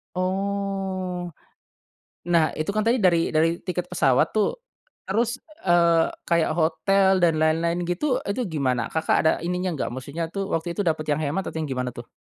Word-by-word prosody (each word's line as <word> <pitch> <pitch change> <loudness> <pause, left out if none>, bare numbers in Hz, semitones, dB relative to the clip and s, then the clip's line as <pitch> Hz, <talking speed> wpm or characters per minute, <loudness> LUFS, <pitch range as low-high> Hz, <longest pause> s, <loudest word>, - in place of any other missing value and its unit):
Oh. 190 -1 -2 1.0
Nah, 170 -2 +5
itu 155 +5 -2
kan 215 - +1
tadi 235 +2 +4
dari 170 -2 +4
dari 160 +1 +4
tiket 180 -1 -3
pesawat 150 -2 +3
tuh, 215 -2 +1 0.5
terus, 230 +5 0 0.3
eee, 170 -2 +4 0.2
kayak 170 -1 +2
hotel 190 +4 +3
dan 170 -2 +3
lain-lain 165 +2 +1
gitu, 195 - 0
itu 200 +5 -2
gimana 130 -7 -1
Kakak 160 0 +1
ada 160 - +4
ininya 180 +1 -1
nggak? - - -2
Maksudnya 140 +6 -4
tuh 195 -1 -3
waktu 170 -1 -2
itu 185 - -4
dapat 155 -1 -1
yang 145 - 0
hemat 155 +6 -1
atau - - -5
yang 155 - -3
gimana 125 -2 -3
tuh? 120 0 -10
170 Hz, 165 wpm, -24 LUFS, 160-190 Hz, 1.0 s, Nah